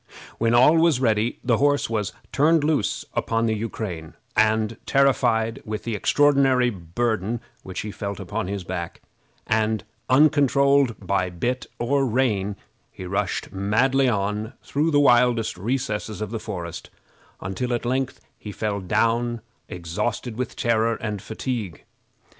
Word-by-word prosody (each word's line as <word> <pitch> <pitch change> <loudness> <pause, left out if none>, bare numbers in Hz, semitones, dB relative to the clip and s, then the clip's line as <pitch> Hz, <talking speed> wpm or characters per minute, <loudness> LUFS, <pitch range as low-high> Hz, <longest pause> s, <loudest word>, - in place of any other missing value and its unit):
When 115 +1 +3
all 130 +7 +6
was 160 -5 +4
ready 110 -2 +1
the 120 -2 +2
horse 145 0 +2
was 105 -3 -2 0.2
turned 155 +2 +3
loose 150 -7 0
upon 115 0 0
the 110 - +1
Ukrain, 105 -7 -5 0.2
and, 110 0 +2
terrified 120 -4 +2
with 110 -1 -5
the 115 - -3
extraordinary 135 +1 +3
burden 110 +4 -2 0.2
which 95 - -6
he 105 - -5
felt 100 -1 -5
upon 105 -2 -3
his 100 -1 -4
back, 85 -1 -5 0.4
and 110 0 +1 0.3
uncontrolled 140 -2 +4
by 95 -1 +1
bit 120 +9 -2
or 135 +4 +1
rein, 110 -6 0 0.4
he 95 - -9
rushed 100 +1 -2
madly 125 +7 +2
on 105 +1 -2
through 150 +3 0
the 145 -2 +3
wildest 120 -4 +4
recesses 110 0 -3
of 110 -1 -4
the 115 - -3
forest, 85 -7 -6 0.5
until 95 +7 -3
at 120 0 -1
length 130 +2 -1 0.2
he 105 - -7
fell 105 0 -2
down 115 +4 0 0.3
exhausted 105 +7 -3
with 125 0 -4
terror 115 -1 +1
and 105 -4 -4
fatigue. 110 -5 -4
115 Hz, 140 wpm, -24 LUFS, 105-130 Hz, 0.5 s, all